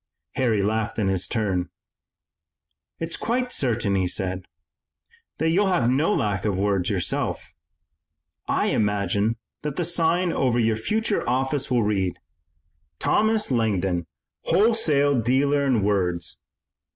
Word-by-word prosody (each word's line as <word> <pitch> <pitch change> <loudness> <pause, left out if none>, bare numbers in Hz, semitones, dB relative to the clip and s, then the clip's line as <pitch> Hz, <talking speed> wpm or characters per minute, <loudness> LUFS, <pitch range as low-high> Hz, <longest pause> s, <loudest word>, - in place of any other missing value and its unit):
Harry 115 -6 +1
laughed 110 +2 -1
in 105 -3 0
his 95 -1 +1
turn. 95 -6 -1 1.3
"It's 165 0 -4
quite 250 +1 -1
certain," 115 - 0
he 95 -2 +1
said, 95 0 -2 0.9
"that 160 - +1
you'll 195 +4 +3
have 130 -11 +2
no 145 +9 +2
lack 105 - 0
of 100 -3 0
words 100 -2 +1
yourself. 95 -6 -2 0.9
I - - +1
imagine 105 +1 0 0.2
that 150 -2 -4
the 175 - -1
sign 170 +1 +1
over 125 -3 +1
your 115 -2 +2
future 215 - -1
office 135 +2 0
will 120 -3 +2
read, 95 -4 0 0.8
'Thomas 220 -5 +1
Langdon, 95 -7 0 0.4
wholesale 160 - +2
dealer 140 +4 +2
in 120 -6 +2
words. 90 -4 -1
115 Hz, 125 wpm, -24 LUFS, 100-150 Hz, 1.3 s, you'll